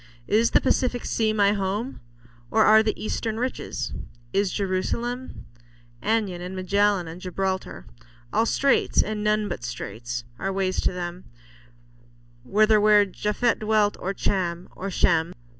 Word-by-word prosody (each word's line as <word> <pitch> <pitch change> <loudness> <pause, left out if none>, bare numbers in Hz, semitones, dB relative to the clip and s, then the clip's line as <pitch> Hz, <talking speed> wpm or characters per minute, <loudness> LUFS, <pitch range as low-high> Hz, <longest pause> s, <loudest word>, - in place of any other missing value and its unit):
Is 225 - +3
the - - +3
Pacific 250 -2 0
sea 220 -1 +1
my 205 -2 +3
home? 205 - -3 0.5
Or 220 - +4
are 220 0 +7
The 220 -1 -1
eastern 220 +1 -2
riches? 255 +1 -3 0.4
Is 195 -1 +1
Jerusalem? 235 +6 -3 0.6
Anyan, 210 -5 0
and 180 +1 -6
Magellan, 200 0 +1
and 165 +3 -9
Gibraltar? 190 - -3 0.5
All 230 - +2
straits, 275 +4 +3
and 210 0 -3
none 210 0 +1
but - - -5
straits, 120 +4 -5 0.2
are 195 - -1
ways 190 -1 0
to - - +1
them 175 0 -6 1.2
Whether 215 - +3
where 210 -1 +6
Japhet 210 +5 0
dwelt, 215 -1 +2
or 190 - -2
Cham, 175 -3 -1
or 195 - -4
Shem. 170 -2 +1
205 Hz, 140 wpm, -25 LUFS, 185-215 Hz, 1.2 s, are